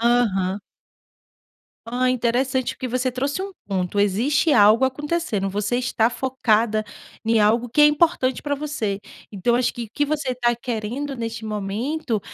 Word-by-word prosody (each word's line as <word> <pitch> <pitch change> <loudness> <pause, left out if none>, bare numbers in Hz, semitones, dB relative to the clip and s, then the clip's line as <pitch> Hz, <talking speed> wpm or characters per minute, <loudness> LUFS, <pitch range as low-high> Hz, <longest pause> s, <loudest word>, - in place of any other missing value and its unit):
Aham. 210 -5 +2 1.3
Hã, 250 +2 +1
interessante, 255 +1 0
porque 255 - -5
você 255 +1 0
trouxe 275 +7 -2
um 395 - -5 0.2
ponto, 190 0 -2
existe 240 - +2
algo 215 +1 +6
acontecendo, 265 - -1
você 205 +4 -1
está 245 -2 +1
focada 230 -3 +1 0.4
em 225 0 +3
algo 230 +3 +3
que 270 - +1
é 295 - +9
importante 295 -4 +2
para 290 -1 -1
você, 280 -9 -3 0.3
então 205 +4 +1
acho 245 0 +1
que 240 -2 -5
o 220 - -14
que 290 - +2
você 290 -3 -2
tá 240 -1 +1
querendo 240 +4 -4
neste 230 -1 -5
momento, 215 +5 -2
240 Hz, 150 wpm, -22 LUFS, 215-265 Hz, 1.3 s, é